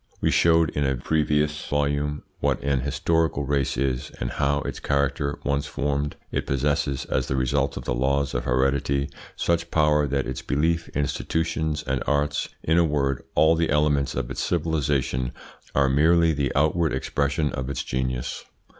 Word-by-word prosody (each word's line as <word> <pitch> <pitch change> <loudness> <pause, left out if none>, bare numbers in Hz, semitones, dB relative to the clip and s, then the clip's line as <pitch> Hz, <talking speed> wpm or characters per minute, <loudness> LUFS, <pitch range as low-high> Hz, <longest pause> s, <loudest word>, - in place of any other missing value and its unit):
We - - +1
showed, 80 -1 +4
in 75 - -1
a 65 -1 +1
previous 75 +2 0
volume, 75 0 0 0.2
what - - +1
an 70 -1 +1
historical 75 +2 0
race 70 -1 0
is, 65 -2 -1
and - - -2
how, 70 0 +1
its - - -5
character 70 0 0
once 70 0 0
formed, 70 +1 -2 0.2
it - - -2
possesses, 70 0 0
as - - -1
the 65 - -1
result 65 +1 0
of - - -5
the - - 0
laws 70 +3 0
of - - -2
heredity 70 +2 +1 0.2
such 85 0 0
power 75 -2 +3
that 70 0 -1
its 65 -2 -4
beliefs, 80 +3 0
institutions, 80 +2 -1
and 65 -2 -1
arts 75 0 0
in 80 +2 +3
a - - +5
word, 70 -4 0
all 80 +1 +5
the 80 0 +1
elements 75 -2 +2
of - - -3
its 65 - -3
civilisation 70 -6 0 0.4
are 70 -1 +4
merely 80 +4 +4
the 70 -3 -1
outward 80 +2 +2
expression 70 +3 0
of 65 +1 -4
its 70 - -2
genius. 65 -1 -3
70 Hz, 165 wpm, -25 LUFS, 70-75 Hz, 0.4 s, a